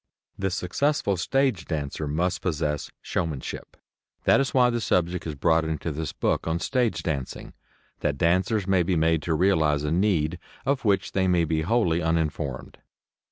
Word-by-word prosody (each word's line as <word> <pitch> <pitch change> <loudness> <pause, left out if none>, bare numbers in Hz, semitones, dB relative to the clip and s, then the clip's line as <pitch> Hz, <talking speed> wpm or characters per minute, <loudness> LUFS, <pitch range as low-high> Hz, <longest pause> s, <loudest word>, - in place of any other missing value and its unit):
The 95 0 -1
successful 100 +5 0
stage 120 0 0
dancer 75 -1 -3
must 85 +5 -1
possess 75 -4 -2
showmanship. 80 -6 -4 0.5
That - - +5
is 135 - 0
why 125 -2 +4
the 120 0 -1
subject 90 -3 0
is 75 - -4
brought 80 +3 +2
into 80 +1 -3
this 75 -1 -4
book - - -1
on 80 +1 +1
stage 125 +5 0
dancing 70 -6 -4 0.5
that 75 -1 -1
dancers 95 - +2
may 95 -1 +3
be 90 +1 +1
made 80 0 +2
to 80 0 -1
realize 80 -5 +2
a 75 - -1
need 90 -3 +1 0.3
of 135 0 0
which 100 -3 +2
they 95 -1 +1
may 90 -2 +3
be 80 0 0
wholly 85 -3 +1
uninformed. 80 -4 -2
85 Hz, 160 wpm, -25 LUFS, 80-95 Hz, 0.5 s, That